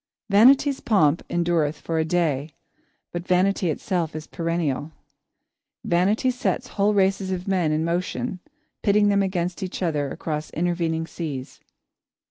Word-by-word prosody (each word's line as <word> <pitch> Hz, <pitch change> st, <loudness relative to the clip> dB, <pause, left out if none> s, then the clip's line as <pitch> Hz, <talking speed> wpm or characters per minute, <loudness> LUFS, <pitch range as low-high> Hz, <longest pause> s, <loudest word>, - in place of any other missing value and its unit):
Vanity's 270 Hz, +6 st, +5 dB
pomp 165 Hz, -8 st, +3 dB
endureth 170 Hz, -3 st, +1 dB
for 165 Hz, -1 st, -2 dB
a -, -, +3 dB
day, 160 Hz, -4 st, 0 dB, 0.6 s
but 175 Hz, +1 st, -5 dB
Vanity 185 Hz, 0 st, +2 dB
itself 165 Hz, -1 st, -2 dB
is 155 Hz, 0 st, -5 dB
perennial. 165 Hz, -4 st, -2 dB, 0.9 s
Vanity 200 Hz, +9 st, +2 dB
sets 250 Hz, +1 st, -2 dB
whole 205 Hz, +1 st, +1 dB
races 195 Hz, -1 st, +2 dB
of 185 Hz, 0 st, -3 dB
men 180 Hz, -5 st, +1 dB
in 155 Hz, +1 st, 0 dB
motion, 180 Hz, +4 st, -2 dB, 0.4 s
pitting 205 Hz, 0 st, +3 dB
them 200 Hz, 0 st, +3 dB
against 180 Hz, -1 st, -2 dB
each 190 Hz, 0 st, -4 dB
other 150 Hz, -5 st, 0 dB
across 150 Hz, +1 st, -4 dB
intervening 165 Hz, -1 st, -1 dB
seas. 145 Hz, -6 st, -6 dB
175 Hz, 130 wpm, -24 LUFS, 160-195 Hz, 0.9 s, Vanity's